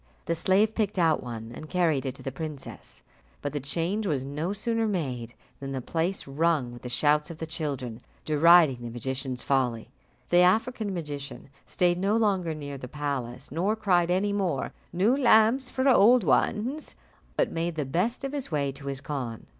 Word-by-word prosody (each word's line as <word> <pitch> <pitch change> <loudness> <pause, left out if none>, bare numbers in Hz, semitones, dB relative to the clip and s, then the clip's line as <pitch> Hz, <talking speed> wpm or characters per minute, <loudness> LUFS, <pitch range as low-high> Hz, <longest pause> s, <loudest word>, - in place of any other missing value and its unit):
The - - 0
slave 195 +6 +2
picked 210 -3 -1
out 165 -3 +3
one 115 -2 -7
and 155 +5 -9
carried 160 -7 +1
it 130 - -4
to - - -12
the 135 - -3
princess; 150 0 -7 0.4
but 145 -1 -4
the 145 - -1
change 170 +10 -1
was 140 -6 -1
no 150 +6 -3
sooner 225 +2 -1
made 130 - -3 0.2
than 135 0 -5
the 135 - -2
place 165 +8 -2
rung 145 -2 +1
with 120 - -11
the 125 - -6
shouts 150 +5 +2
of 165 - -8
the 160 - -4
children, 135 -7 -4 0.2
deriding 155 -2 +6
the 120 - -5
magician's 130 +1 -4
folly. 125 -5 0 0.4
The 175 - +5
African 215 +4 +2
magician 145 -6 -6 0.2
stayed 175 -1 +1
no 200 +4 +2
longer 190 -7 +1
near 145 -2 -6
the 125 - -7
palace, 135 -3 -4
nor 185 +8 0
cried 180 -5 +2
any 195 +3 +1
more, 185 -9 -1 0.2
"New 195 +9 +3
lamps 250 0 +4
for 260 +1 0
old 245 -1 +6
ones," 245 - 0 0.4
but - - +2
made 170 0 -2
the 150 -3 -2
best 185 - -1
of 275 - -2
his 285 -3 -4
way 140 -3 0
to 140 +1 -10
his 135 -1 -4
khan. 130 -6 -5
160 Hz, 185 wpm, -27 LUFS, 135-195 Hz, 0.4 s, deriding